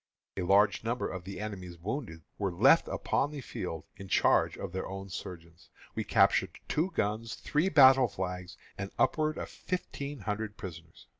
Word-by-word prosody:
A 95 - -2
large 100 +4 +4
number 120 +2 -1
of 90 -2 -6
the 100 0 -6
enemy's 95 -5 -6
wounded 95 - -5 0.2
were 100 -2 0
left 125 - +5
upon 145 - 0
the 150 -1 -7
field 90 - -5
in 100 - -9
charge - - +3
of - - -5
their 95 +1 -3
own 95 +1 -7
surgeons. 85 -1 -9 0.2
We - - -2
captured - - +3
two 160 +5 +1
guns, 110 +2 -1
three 155 +6 0
battle 135 -5 +7
flags, 90 -2 -5 0.2
and 100 -1 -3
upward 155 0 +2
of - - -4
fifteen 145 -6 -5
hundred 105 0 -3
prisoners. 80 -3 -10
100 Hz, 165 wpm, -31 LUFS, 90-130 Hz, 0.2 s, battle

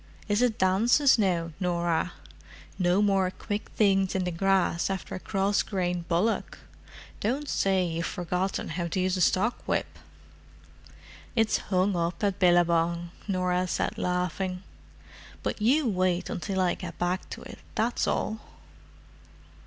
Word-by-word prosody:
"Is 205 +2 +1
it 245 -3 +2
dances 230 +9 +4
now, 175 -5 +1
Norah? 175 -2 0 0.7
No 180 +3 +3
more 195 -2 +2
quick 205 +2 -5
things 195 -3 +3
over 185 -1 0
the 180 - -1
grass 185 0 +1
after 190 -1 -4
a - - -4
cross 195 +1 +1
grained 180 -3 -2
bullock? 180 +7 0 0.6
Don't 270 +7 -1
say 190 -6 +1
you've 165 0 -2
forgotten 180 +2 -2
how 170 +2 -2
to 170 - -2
use 185 0 +1
a 185 - -1
stockwhip!" 200 +7 0 1.4
"It's 225 -2 +3
hung 185 0 +2
up 170 +2 -2
at 200 -2 0
Billabong," 170 -1 +3 0.2
Norah 185 -1 0
said - - -1
laughing. 180 +1 -2 0.8
"But - - -3
you 265 +6 +3
wait 185 -3 0
until 190 +1 -3
I 180 -1 +2
get - - -7
back 180 +1 -1
to - - -8
it, - - -10 0.2
that's 235 +2 0
all!" 220 - -1
185 Hz, 135 wpm, -27 LUFS, 175-200 Hz, 1.4 s, dances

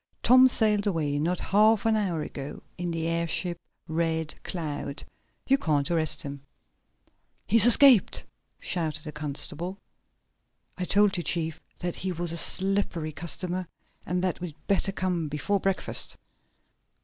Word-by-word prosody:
"Tom 255 +1 +7
sailed 215 -4 +1
away 150 -6 -1
not 170 +4 -1
half 215 +2 +3
an 225 -1 +3
hour 180 -7 -1
ago 140 0 -8
in 175 0 -4
the 165 -1 -3
airship 170 +1 -1 0.3
Red 160 -1 -1
Cloud! 145 -4 -5 0.4
You 275 +1 +3
can't 150 - 0
arrest 160 -3 -1
him!" 140 -1 -7 1.0
"He's 230 +2 +8
escaped!" 245 -3 +6 0.3
shouted 155 -3 -3
the 155 - -6
constable. 155 +5 -3 1.0
"I 180 - -3
told 200 0 +2
you, - - -1
chief, 160 -2 -2 0.2
that 175 -1 -4
he 190 - -3
was 175 -1 -3
a 170 - -2
slippery 190 -3 0
customer, 175 +3 -4 0.4
and 180 +1 -2
that 185 -1 -2
we'd 170 -5 -6
better 195 0 +1
come 180 -4 -2
before 150 +8 -1
breakfast!" 195 0 0
175 Hz, 135 wpm, -26 LUFS, 155-195 Hz, 1.0 s, He's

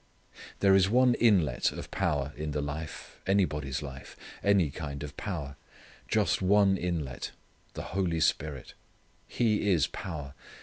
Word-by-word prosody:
There 100 -1 +6
is 95 0 +5
one 125 +2 +5
inlet 95 - +3
of - - -8
power 70 0 -1
in 75 0 -4
the 75 - -1
life 75 +2 -7
anybody's 75 -8 +1
life 65 -1 -9 0.3
any 95 -7 +3
kind 70 -1 -6
of 75 0 -7
power: 75 -9 -5 0.5
just - - +1
one 100 +1 +4
inlet 85 -8 -3 0.5
the - - -4
Holy 90 -4 0
Spirit. 75 -3 -1 0.5
He 105 -3 +1
is 80 -6 +4
power. 75 -7 -6
80 Hz, 135 wpm, -29 LUFS, 70-95 Hz, 0.5 s, There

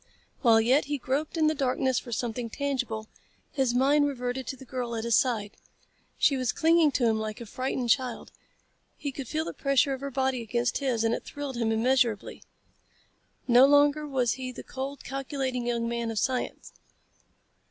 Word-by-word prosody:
While 230 -4 +6
yet 250 +6 +3
he 290 +1 -2
groped 280 +6 -2
in 315 - +3
the 310 - +3
darkness 260 -2 0
for 240 - -10
something 235 0 -3
tangible, 250 -5 -3 0.4
his 260 -4 0
mind 290 +3 +4
reverted 250 -2 -3
to - - -3
the 265 - -12
girl 245 -2 -4
at 225 - -3
his 235 0 +2
side. 220 -6 0 0.6
She 280 - +3
was 255 -3 0
clinging 325 -1 +4
to 245 - +1
him 220 -1 +1
like 215 -1 -4
a 235 - -7
frightened 255 +1 -2
child. 255 -2 -1 0.7
He 285 -2 -4
could 270 -1 -7
feel 315 +4 -2
the - - -5
pressure 275 0 +2
of 265 - -6
her 280 - -3
body 265 -1 0
against 240 +2 -1
his 255 -5 0
and 225 0 +2
it - - -3
thrilled 285 -3 -6
him 230 -2 0
immeasurably. 235 -1 +1 1.1
No 250 +2 +7
longer 290 +1 +4
was 255 -4 +1
he 260 -1 -4
the - - -9
cold, 270 +1 -6
calculating 265 -2 -3
young 235 -1 0
man 235 0 -2
of 225 - -4
science. 255 +3 -2
255 Hz, 185 wpm, -27 LUFS, 235-275 Hz, 1.1 s, No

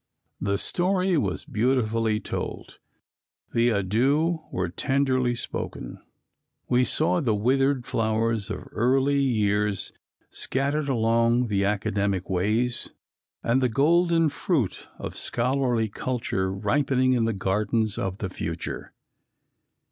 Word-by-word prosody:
The 100 0 0
story 185 - +1
was 100 - -1
beautifully 115 -2 +1
told, - - -6 0.7
the 120 +1 +3
adieux 130 - +1
were 90 -1 -1
tenderly 130 +4 +1
spoken. - - -5 0.7
We 125 +1 +3
saw 165 +6 +1
the 115 -7 +1
withered 130 +4 +2
flowers 110 -1 0
of - - -4
early 135 +4 +2
years 105 -6 +1 0.4
scattered 140 +2 -1
along 115 0 +2
the 100 -1 +1
academic 100 -2 -1
ways, 110 +7 0 0.5
and 125 +3 +2
the 125 - +2
golden 165 +5 +3
fruit 140 - -1
of - - -6
scholarly 125 -2 0
culture 105 -4 -2
ripening 130 +5 +1
in 120 -2 +2
the 115 - +1
gardens 105 +2 0
of 95 0 -2
the 95 - -4
future. 80 -2 -5
115 Hz, 110 wpm, -25 LUFS, 105-135 Hz, 0.7 s, the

